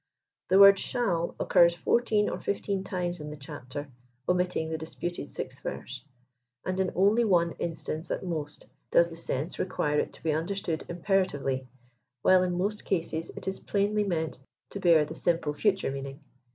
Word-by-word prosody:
The 185 - +2
wotd 200 0 +9
"shall" 190 -8 -1
occurs 170 0 +5
fduiteeil 215 +3 +2
or - - -4
fifteen 200 -1 -2
times 180 -2 -3
in 150 - -6
the 150 - -7
chapter, 135 +1 -7 0.4
omittilig 180 -3 +1
the 160 - -1
disputed 175 +2 -5
6th - - -7
Verse* - - -6 0.6
and 185 0 -1
in 190 -1 +1
only 205 +6 +4
one 175 -6 +3
instance 160 0 -4
at - - -2
most 155 -4 -4 0.2
does 170 0 +4
the - - -7
sense 165 -1 -3
require 150 -5 +1
Jt - - -10
to - - -14
he 160 - +1
understood 165 +1 -2
imperatively, 170 -8 0 0.6
while 185 -1 +6
in 180 -1 0
most 205 +3 -1
cases 165 -3 -2
it - - -9
is 190 - -2
plainly 205 +1 +1
meant 160 -8 -2 0.3
to 200 - -5
hear 165 -4 +5
the - - -7
simple 165 -4 0
future 195 0 +1
meaning. 135 +1 -6
175 Hz, 165 wpm, -28 LUFS, 160-195 Hz, 0.6 s, wotd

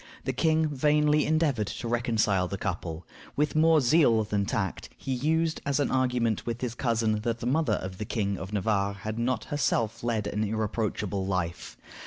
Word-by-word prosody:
The - - -2
king 160 0 +2
vainly 150 +1 +2
endeavored 150 -9 +1
to 120 - -5
reconcile 110 -6 +1
the 100 - -4
couple. 90 -3 -4 0.3
With 150 +1 0
more 160 0 +5
zeal 120 -5 +4
than 100 -1 -1
tact, 95 -3 -2
he 135 - -3
used 160 +5 0
as 140 0 0
an 145 - +1
argument 125 -4 +1
with 120 0 -4
his 125 -3 -2
cousin 115 -3 0
that 115 +1 -1
the 115 - -5
mother 130 -2 +2
of 95 0 -7
the 105 - -3
King 100 -2 -1
of 95 - -7
Navarre 100 -1 0
had 110 +3 -5
not 125 +2 0
herself 115 -7 0
led 115 -3 0
an 105 +1 -1
irreproachable 105 -2 -2
life. 85 -4 -3
115 Hz, 180 wpm, -28 LUFS, 100-140 Hz, 0.3 s, more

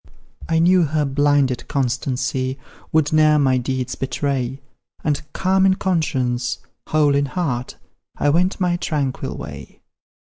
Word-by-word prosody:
I 165 - +2
knew 180 +2 +5
her 150 0 0
blinded 140 -2 +1
constancy 130 0 -1 0.3
Would 155 -1 +2
ne'er 155 -1 +5
my 130 -3 +3
deeds 130 0 -2
betray, 135 -1 -2 0.4
And, 150 -2 0
calm 190 0 +2
in 190 -1 +4
conscience, 130 -10 0 0.3
whole 150 -2 +3
in 140 0 +2
heart. 135 -7 -3 0.4
I 145 - +2
went 180 +6 +1
my 175 -2 +1
tranquil 145 -6 -2
way. - - -9
145 Hz, 130 wpm, -21 LUFS, 130-160 Hz, 0.4 s, knew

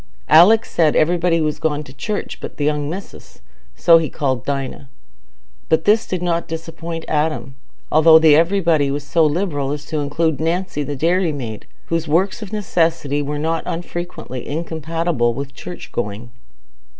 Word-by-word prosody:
Alick 195 +9 +7
said 160 -3 +2
everybody 170 +1 +2
was 155 -1 -1
gone 150 -1 -1
to 135 - -13
church 205 +9 -4
"but - - -8
th' - - -6
young 145 0 0
missis"—so 170 -1 -1
he 160 - -2
called 130 -5 -2
Dinah—but 140 +3 -5
this 215 +2 +3
did 180 -1 -3
not 170 -1 -1
disappoint 165 0 -6
Adam, 150 -3 -1 0.4
although 160 +1 +7
the 160 -2 +6
"everybody" 165 -3 +2
was 145 +1 -3
so 165 +3 +2
liberal 150 -3 0
as 150 0 -5
to 155 - -3
include 150 +1 0
Nancy 165 0 -1
the 145 0 -3
dairymaid, 150 - -1 0.2
whose 165 -1 -2
works 185 +8 +1
of 210 - -8
necessity 165 -8 0
were 145 +1 -3
not 160 +2 -1
unfrequently 170 -6 -5
incompatible 160 -5 -1
with 140 +1 -6
church 175 - -9
going. 115 +1 -4
160 Hz, 150 wpm, -19 LUFS, 145-170 Hz, 0.4 s, Alick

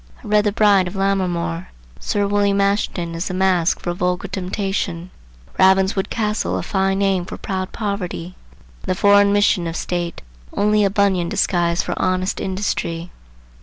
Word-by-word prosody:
I - - -9
read 210 0 +3
the 205 - +2
Bride 200 -3 +4
of 180 - -7
Lammermoor. 185 -3 -1 0.3
Sir 205 -1 0
William 200 0 +2
Ashton 200 -4 0
is 165 +3 -3
a 185 - -3
mask 185 -3 +2
for 175 - -2
a - - -3
vulgar 180 +2 -1
temptation, 185 -2 -3 0.5
Ravenswood 190 +1 +3
Castle 210 -2 -1
a - - -3
fine 195 -1 0
name 195 -2 +1
for 175 - -8
proud 185 -1 -4
poverty, 190 -5 -4 0.5
and - - -9
the 185 - +1
foreign 200 +1 +5
mission 205 -3 +2
of 165 - -4
state 175 0 -3 0.3
only 210 +1 +2
a 200 - +3
Bunyan 195 -4 +1
disguise 170 -1 +1
for - - -3
honest 185 0 0
industry. 180 -3 -3
190 Hz, 165 wpm, -20 LUFS, 180-200 Hz, 0.5 s, foreign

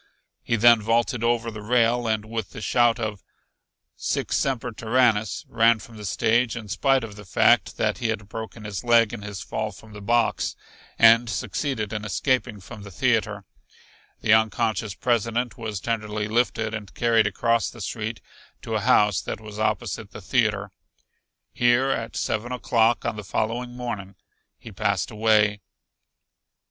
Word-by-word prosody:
He 115 - 0
then 115 0 +6
vaulted 115 +2 0
over 115 0 +1
the 105 -1 -8
rail 120 +1 +2
and 110 -1 -1
with 110 -2 -5
the - - -7
shout 120 +1 +2
of 105 -3 -4 0.7
"sic - - -2
semper 125 -3 0
tyrannis" 110 -2 +1
ran 115 0 +4
from 115 +1 -13
the 105 -1 -8
stage 115 +5 +1
in 110 -3 -7
spite 135 +5 +2
of 105 -3 -8
the 105 - -11
fact 95 - +3
that - - 0
he 115 - -1
had 105 -2 -3
broken 110 0 -7
his 105 -1 -5
leg 115 -2 +4
in 115 - -6
his 100 -2 -7
fall 110 -1 -3
from 105 +3 -15
the 105 - -9
box, 120 +3 +1 0.4
and 115 +1 +6
succeeded 110 +2 -3
in 105 -1 -3
escaping 120 0 -1
from 105 +3 -11
the 100 - -10
theater. 105 0 0 0.8
The 110 - +4
unconscious 110 -2 +1
President 120 0 0
was 110 -4 -5
tenderly 105 -1 -2
lifted 110 -1 0
and 105 -3 -6
carried 115 -2 +3
across 115 -1 +1
the 120 - -13
street 110 +1 -4 0.4
to 115 - -5
a 110 - +1
house 105 -4 +3
that - - -5
was 105 -1 -10
opposite 110 -1 -2
the - - -10
theater. 105 -2 0 0.8
Here 120 +2 +3
at 115 -3 -3
seven 110 +3 -2
o'clock 120 -2 +1
on 115 -2 -2
the 105 - -6
following 120 +5 -2
morning 100 -6 -5 0.4
he - - -12
passed - - -1
away. 105 -1 +2
110 Hz, 160 wpm, -24 LUFS, 105-120 Hz, 0.8 s, then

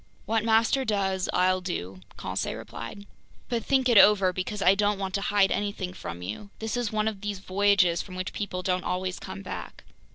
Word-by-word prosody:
"What 220 +1 +1
master 225 +4 +3
does, 195 -5 0
I'll 185 0 +2
do," 95 - -4 0.2
Conseil 95 +3 -3
replied. 115 - -8 0.4
"But 235 -3 -1
think 265 0 +2
it 235 -4 +7
over, 195 -3 +6
because 185 +3 -3
I 185 - +7
don't 205 0 +1
want 190 -1 -4
to 200 - 0
hide 200 -1 +3
anything 200 -3 -2
from 90 - -7
you. 105 - -6
This 220 0 -3
is 245 -3 -1
one 215 0 0
of 210 -3 -3
those 205 -1 -3
voyages 190 -2 +2
from 185 - -10
which 185 +1 -4
people 185 -3 -4
don't 180 0 0
always 185 0 -2
come 95 +1 -8
back!" - - -7
195 Hz, 195 wpm, -27 LUFS, 180-210 Hz, 0.4 s, it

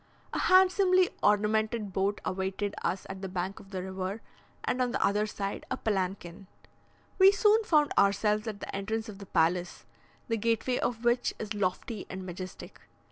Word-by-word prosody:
A - - -1
handsomely 370 0 +5
ornamented 210 0 +1
boat 195 +2 0
awaited 190 +2 -2
us 190 - -1
at 190 0 -7
the 195 - -4
bank 185 +1 -3
of 195 - -15
the 185 -2 -4
river, 190 +3 -4 0.4
and 255 - 0
on 250 - +2
the - - +1
other 210 +2 +1
side 200 -1 -4
a - - -2
palanquin. 190 -3 -3 0.7
We 380 +1 +9
soon 425 +2 +4
found 300 -7 +3
ourselves 210 +2 +2
at 215 -2 -5
the - - -6
entrance 220 +3 -3
of 200 -2 -9
the 200 - -10
palace, 175 +1 0 0.4
the 230 -2 0
gateway 230 +3 0
of 235 -1 -2
which 240 +1 +2
is 215 0 -4
lofty 205 +2 -2
and 190 0 -6
majestic. 185 +1 -8
205 Hz, 170 wpm, -29 LUFS, 190-230 Hz, 0.7 s, We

